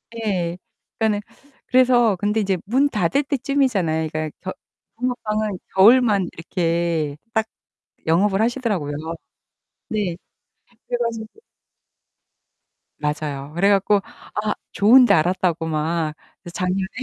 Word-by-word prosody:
예. 185 -6 -2 0.4
그니까는 215 -2 +1 0.5
그래서 245 -4 +4
근데 205 +3 0
이제 195 -3 0
문 265 +7 +2
닫을 215 +5 +1
때 280 0 -1
쯤이잖아요. 205 - 0
그니까 155 0 -2
겨 185 - -5 0.4
붕어빵은 215 -5 -2 0.2
겨울만 210 -1 +5
이렇게 165 -3 -1 0.2
딱 220 0 +1 0.6
영업을 195 +5 +2
하시더라고요. 225 - -1 1.0
네. 200 -6 -2 0.7
그래 245 - -1
가지고 230 -2 -3 1.7
맞아요. 150 -1 -3
그래 195 +4 +3
갖고 200 +1 +4 0.4
아 210 0 0 0.2
좋은 235 +7 +7
데 - - +4
알았다고 170 0 +1
막 155 0 -1 0.3
그래서 175 - -10
작년에 185 +1 -1
195 Hz, 255 characters per minute, -22 LUFS, 170-225 Hz, 1.7 s, 좋은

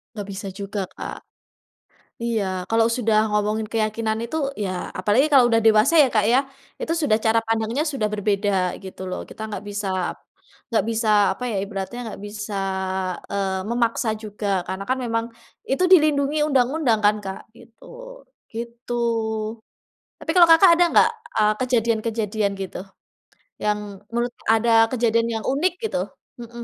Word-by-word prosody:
Nggak 205 -2 -6
bisa 195 +1 -6
juga, 200 +1 -4
Kak. - - -7 1.1
Iya 230 -3 0 0.3
kalau 225 0 +3
sudah 225 -3 +2
ngomongin 210 +1 0
keyakinan 220 0 -1
itu, 275 +7 -4 0.3
ya 195 - -2 0.3
apalagi 210 +9 +3
kalau 265 -4 +7
udah 225 -1 +3
dewasa 220 +8 +5
ya, - - +3
Kak, 215 -2 +3
ya, 250 - +5 0.4
itu 330 - -1
sudah 220 -8 +3
cara 225 +1 +4
pandangnya 225 +5 0
sudah 270 -8 -1
berbeda 205 0 0 0.3
gitu 190 0 -9
loh. 185 - -4
Kita - - -11
enggak 205 -3 -5
bisa 195 -3 -2 0.5
enggak 230 - +1
bisa, 225 0 -1 0.3
apa - - -8
ya, - - -2
ibaratnya 200 +3 -5
enggak 220 -4 -7
bisa, 210 0 -6 0.8
eee, 195 -1 -1
memaksa 235 -1 0
juga 210 0 -5 0.2
karena 190 +1 -4
kan 260 - +1
memang, 230 -1 -1 0.5
itu 275 +7 +1
dilindungi 300 -3 +4
undang-undang 265 -3 +2
kan, 210 +1 +5
Kak, 190 0 -6
gitu. 235 -1 -18 0.7
Gitu. 235 +1 -6 1.3
Tapi - - -2
kalau 350 -2 +7
Kakak 330 +2 +8
ada 345 +1 +4
nggak, - - +5 0.3
eee, 215 -1 +4
kejadian-kejadian 225 -4 0
gitu, 190 - -5 0.8
yang 210 0 +1 0.3
menurut 240 +1 -2 0.2
ada 225 +1 +3 0.2
kejadian 230 -2 +1
yang - - -9
unik 300 +8 +1
gitu, - - -2 0.4
mhm, 235 0 -9
225 Hz, 145 wpm, -23 LUFS, 210-245 Hz, 1.3 s, Kakak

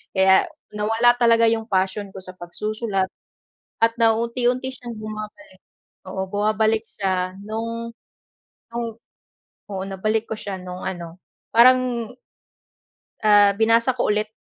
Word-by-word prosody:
kaya 190 - +5 0.2
nawala 225 +3 +3
talaga 230 -1 +5
yung 225 -1 -1
passion 195 0 0
ko 190 - -6
sa 185 - -9
pagsusulat 195 +3 -3 0.8
at 230 - +4
nauunti-unti 240 +3 +1
siyang 240 -2 -8
bumabalik, 215 +6 -8 0.6
oo 190 0 -3
bumabalik 215 +1 +1 0.2
siya 185 -2 -1
nung 230 +1 -4 0.8
nung 235 0 -2 0.8
oo 190 -1 -3
nabalik 215 +3 -1
ko - - -1
siya 195 -3 -5
nung 180 0 -8
ano 170 -2 -6 0.4
parang, 245 -1 +4 1.2
ah 205 -1 +7
binasa 230 +2 +4
ko - - +2
ulit 210 0 0
215 Hz, 115 wpm, -22 LUFS, 195-230 Hz, 1.2 s, ah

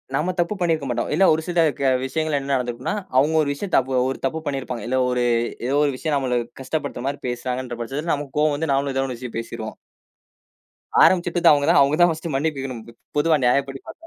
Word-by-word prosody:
நம்ம 155 +6 0
தப்பு 175 +4 +1
பண்ணியிருக்க 160 -5 0
மாட்டோம். 120 - -1
இல்ல 190 +5 +4
ஒரு 160 - 0
சில 175 -1 0 0.2
க 135 -1 +2 0.2
விஷயங்கள்ல 155 +1 -1
என்ன 140 0 -2
நடந்திருக்கும்னா, 120 - -2 0.2
அவுங்க 150 +4 +3
ஒரு 145 - -2
விஷயத்த 180 +6 -3
தபு 130 0 0 0.2
ஒரு 135 - -3
தப்பு 160 +4 -1
பண்ணி 140 -1 -1
இருப்பாங்க. 125 -4 -6
இல்ல 130 +2 0
ஒரு 125 -1 0 0.4
ஏதோ 135 - 0
ஒரு 145 - +2
விஷயம் 155 0 -1
நம்மள 125 -3 0 0.2
கஷ்டப்படுத்தற 140 -2 -4
மாரி 140 +1 -3
பேசுறாங்கன்ற 125 0 -4
பட்சத்துல 145 +8 -2
நமக்கு 145 -1 -5
கோவம் 150 -1 +3
வந்து 155 0 -1
நாமளும் 140 0 0
ஏதோன்னு 135 -1 0
ஒரு 120 - -10
விஷயம் 125 -3 -6
பேசிருவோம். 115 -1 -6 1.3
ஆரம்பிச்சிட்டது 175 -1 +4
அவுங்க 145 -1 +2
தான். - - +6
அவுங்க 140 +2 +3
தான் 175 0 +6
ஃபர்ஸ்ட் 160 +1 -4
மன்னிப்பு 150 +1 -1
கேட்கணும். 130 -4 -5
பொ - - -11 0.3
பொதுவா 155 +1 +4
நியாயப்படி 135 +2 +1
பாத்தா. 330 - -11
140 Hz, 210 wpm, -22 LUFS, 130-155 Hz, 1.3 s, தான்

